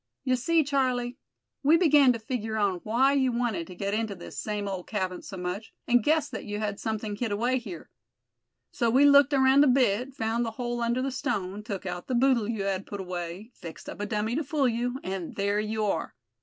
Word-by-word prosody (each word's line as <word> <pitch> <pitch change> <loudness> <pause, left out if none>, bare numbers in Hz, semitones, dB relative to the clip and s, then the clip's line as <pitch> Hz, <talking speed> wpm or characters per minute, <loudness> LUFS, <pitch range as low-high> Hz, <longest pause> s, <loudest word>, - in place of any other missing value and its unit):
"You 255 -1 +2
see, 320 +6 +2
Charlie, 255 -3 0 0.4
we 300 +4 +5
began 295 -6 +6
to 240 - -1
figure 220 -1 -3
on 200 -4 +1
why 255 +6 +3
you 265 -2 +2
wanted 235 -8 -1
to 180 - -10
get 200 +2 -2
into 215 -2 -1
this 175 - -10
same 210 -1 -3
old 190 -2 -5
cabin 185 -4 -2
so 195 - -8
much, 180 +4 -5
and 245 -2 +4
guessed 305 +1 +2
that - - -5
you 205 0 -4
had 210 -1 -3
something 215 -1 -3
hid 225 +1 -2
away 240 +5 +1
here. 190 -9 -9 0.8
So 235 - +1
we 265 +5 +5
looked 285 0 +7
around 270 0 +5
a - - +4
bit, 255 0 +2
found 225 0 0
the 230 - -1
hole 240 -1 -2
under 235 +2 0
the 270 - -1
stone, 200 -5 -3
took 205 -3 -6
out 175 - -5
the 255 - -1
boodle 240 -3 +3
you 220 -4 -2
had 195 -1 -2
put 200 - -6
away, 180 +3 -6
fixed 165 -2 -10
up - - -7
a 205 - -2
dummy 215 +2 -1
to 315 - 0
fool 285 -1 +1
you; 245 +2 -1
and 185 -2 -4
there 200 +1 0
you 215 0 -1
are. 180 -5 -2
225 Hz, 220 wpm, -27 LUFS, 200-255 Hz, 0.8 s, looked